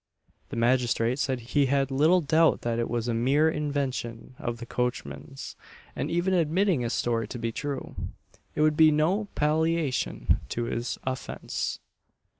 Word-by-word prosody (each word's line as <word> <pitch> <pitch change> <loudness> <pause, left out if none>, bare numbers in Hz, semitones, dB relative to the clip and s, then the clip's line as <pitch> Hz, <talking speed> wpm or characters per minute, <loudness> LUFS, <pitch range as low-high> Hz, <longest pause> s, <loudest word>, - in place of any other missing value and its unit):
The - - -6
magistrate 120 +1 +2
said 130 -2 0
he 135 +4 +1
had 135 0 +1
little 155 +7 +4
doubt 160 +2 +3
that 115 -1 -1
it 115 - -1
was 120 0 -1
a 120 - 0
mere 135 +7 +3
invention 140 -6 -3
of 120 -1 -3
the 120 - -7
coachman's; 125 +2 -4 0.4
and - - -2
even 175 +3 +1
admitting 175 -1 +2
his 120 -1 -1
story 115 -1 0
to 125 - -6
be 115 -1 -2
true, 140 +3 -4 0.6
it - - 0
would 155 0 +4
be 155 0 +7
no 160 +8 +2
palliation 155 -1 +1 0.2
of 120 - 0
his 120 +1 -3
offence. 130 0 -3
135 Hz, 155 wpm, -27 LUFS, 120-155 Hz, 0.6 s, be